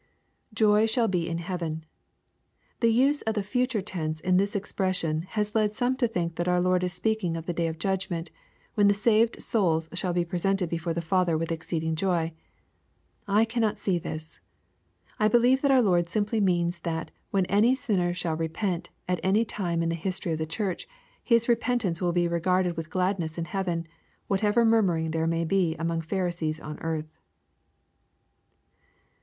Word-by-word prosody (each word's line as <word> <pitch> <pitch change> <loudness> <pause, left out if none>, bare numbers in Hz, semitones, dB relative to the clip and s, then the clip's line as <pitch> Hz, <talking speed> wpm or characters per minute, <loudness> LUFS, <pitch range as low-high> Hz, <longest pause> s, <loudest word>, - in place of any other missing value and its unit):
\Joy 215 0 +4
shall 230 +1 +2
he 175 -3 0
in 165 - -2
heaven^ 170 -2 -4 1.0
The 230 -1 +4
use 275 +5 +3
of 220 0 -2
the 205 - 0
future 245 +1 0
tense 160 -5 -3
in 180 +2 +2
this 200 +2 +1
ex 200 0 -3
pression, 180 -4 -1
has 210 0 0
led 215 -1 +1
some 250 +3 +1
to 245 - +2
think 170 -6 -3
that 175 - -1
our 180 0 +3
Lord 180 0 +2
is 180 - 0
speaking 180 -2 -1
of 165 - -6
the 175 - -2
day 170 0 0
of 160 0 -4
judgment, 175 -2 -2 0.4
when 205 -1 +4
the 200 - +4
saved 220 +2 +2
souls 165 -8 +1
shall 180 0 0
be 175 0 0
presented 180 +1 0
before 165 0 -2
the 170 - -2
Father 175 -1 +2
with 165 +1 -2
exceeding 160 -1 -2
joy. 170 -2 0 0.9
I 210 +3 +4
cannot 225 -2 0
see 185 -3 0
this. 155 0 -7 0.8
I 215 - +4
believe 245 +4 +4
that 280 - +2
our 260 -2 +5
Lord 175 -4 +2
simply 210 +2 0
means 175 -2 +1
that 165 -1 -4 0.2
when 195 -2 +1
any 210 +7 +3
sinner 190 -9 0
shall 175 -2 -2
repent, 165 +3 -2 0.2
at 180 -1 0
any 205 +5 +2
time 175 -6 -2
in 165 - 0
the - - 0
history 180 +1 -2
of 160 - -1
the 160 - -2
Church, 195 - -3 0.4
his 235 -1 +3
repentance 235 -7 +1
will 175 -1 +1
be 175 0 +2
regarded 175 +1 +1
with 165 -1 -5
gladness 180 -3 -1
in 170 - -2
heaven, 175 -3 -2 0.4
whatever 210 +4 +2
murmuring 180 -8 +2
there 160 0 0
may 165 0 0
be 175 -2 +1
among 165 0 -1
Pharisees 170 -3 -2
on 150 -1 -7
earth. 155 -1 -4
180 Hz, 180 wpm, -27 LUFS, 165-210 Hz, 1.0 s, our